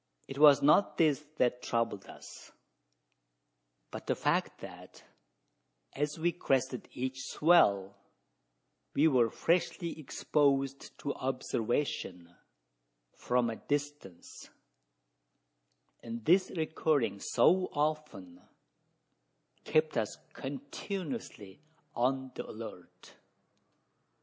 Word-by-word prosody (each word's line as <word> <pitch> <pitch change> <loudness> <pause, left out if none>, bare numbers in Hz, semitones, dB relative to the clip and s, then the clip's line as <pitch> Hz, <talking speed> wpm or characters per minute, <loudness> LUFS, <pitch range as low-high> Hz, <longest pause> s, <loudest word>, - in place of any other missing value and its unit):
It 135 0 -7
was 145 -2 +7
not 150 +8 +4
this 150 -3 +3
that 125 0 +1
troubled 115 -4 -2
us; - - -12 1.4
but - - -8
the - - +1
fact - - 0
that, - - -12 0.9
as 150 +2 -2
we 170 +2 +1
crested 130 -6 -1
each 130 +1 -4
swell, 100 - +3 1.0
we 150 +3 +5
were 125 -6 +3
freshly 170 - -1
exposed 140 -2 0
to 140 - -2
observation 120 -8 -3 0.8
from 125 -1 0
a 110 - -6
distance; 145 - -5 1.5
and 115 -1 -7
this 185 +3 +4
recurring 155 - 0
so 185 - +3
often, 145 - -3 1.2
kept 155 -3 +1
us 110 -2 -2 0.2
continuously 145 - -6 0.3
on 130 +2 0
the - - -7
alert. 110 -5 -10
135 Hz, 90 wpm, -31 LUFS, 115-155 Hz, 1.5 s, was